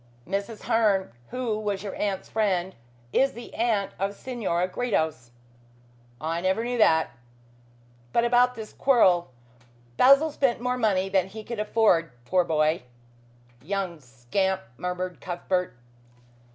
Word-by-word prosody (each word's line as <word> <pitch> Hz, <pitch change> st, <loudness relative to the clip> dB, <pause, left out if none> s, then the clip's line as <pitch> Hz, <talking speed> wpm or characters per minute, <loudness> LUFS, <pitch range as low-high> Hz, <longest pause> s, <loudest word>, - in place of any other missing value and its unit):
"Mrs. 200 Hz, +4 st, -3 dB
Herne, 215 Hz, -, +2 dB, 0.2 s
who 240 Hz, -4 st, -2 dB
was 205 Hz, -2 st, -2 dB
your 200 Hz, -, -5 dB
aunt's 195 Hz, -2 st, -2 dB
friend, 190 Hz, -4 st, 0 dB, 0.4 s
is 270 Hz, +1 st, +3 dB
the 235 Hz, 0 st, -10 dB
aunt 220 Hz, -4 st, 0 dB
of 200 Hz, +1 st, -1 dB
Senora 195 Hz, -9 st, -2 dB
Gredos." 160 Hz, -, -1 dB, 0.9 s
"I 165 Hz, +2 st, -2 dB
never 190 Hz, +5 st, +1 dB
knew 245 Hz, 0 st, -2 dB
that. 160 Hz, -6 st, +4 dB, 1.0 s
But 235 Hz, -, +2 dB
about 245 Hz, +1 st, +4 dB
this 220 Hz, -1 st, -8 dB
quarrel. 185 Hz, -, +4 dB, 0.7 s
Basil 275 Hz, +5 st, +6 dB
spent 265 Hz, -5 st, +1 dB
more 250 Hz, +1 st, -1 dB
money 195 Hz, -4 st, +2 dB
than 190 Hz, -1 st, +1 dB
he 215 Hz, +3 st, -9 dB
could 235 Hz, 0 st, -6 dB
afford, 210 Hz, -6 st, +3 dB, 0.2 s
poor 180 Hz, +6 st, +3 dB
boy 155 Hz, 0 st, +1 dB, 0.4 s
" 120 Hz, 0 st, -30 dB
"Young 185 Hz, +1 st, -3 dB
scamp," 130 Hz, -, -2 dB
murmured 180 Hz, +3 st, -4 dB
Cuthbert. 180 Hz, -2 st, -2 dB
195 Hz, 130 wpm, -26 LUFS, 175-230 Hz, 1.0 s, Basil